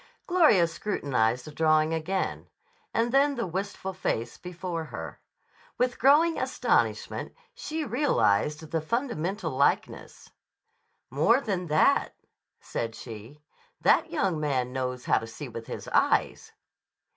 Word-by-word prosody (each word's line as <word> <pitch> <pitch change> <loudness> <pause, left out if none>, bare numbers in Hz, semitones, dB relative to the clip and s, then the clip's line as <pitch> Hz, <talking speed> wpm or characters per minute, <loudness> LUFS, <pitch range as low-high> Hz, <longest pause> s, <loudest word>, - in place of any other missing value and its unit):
Gloria 315 - +5
scrutinized 130 - -1
the 155 - -9
drawing 155 +1 +2
again, 175 +4 -2 0.4
and 230 +1 0
then 280 +2 +3
the 235 - -2
wistful 190 +1 -4
face 120 -10 -2
before 175 -2 -5
her. 80 - -8 0.6
With 250 0 0
growing 305 +6 +5
astonishment - - 0 0.2
she 315 +1 -4
realized 155 - +1
the 165 - 0
fundamental 205 - -2
likeness. - - -1 0.8
"More 235 +3 +4
than 190 -9 -3
that," 155 0 +3 0.4
said 115 -1 -4
she. 120 +6 -10 0.4
"That - - +4
young 180 -5 0
man 130 -4 -1
knows 125 -1 -3
how - - +3
to 115 - -8
see 140 +5 -8
with 115 -1 -8
his - - -7
eyes." - - +1
165 Hz, 120 wpm, -27 LUFS, -, 0.8 s, Gloria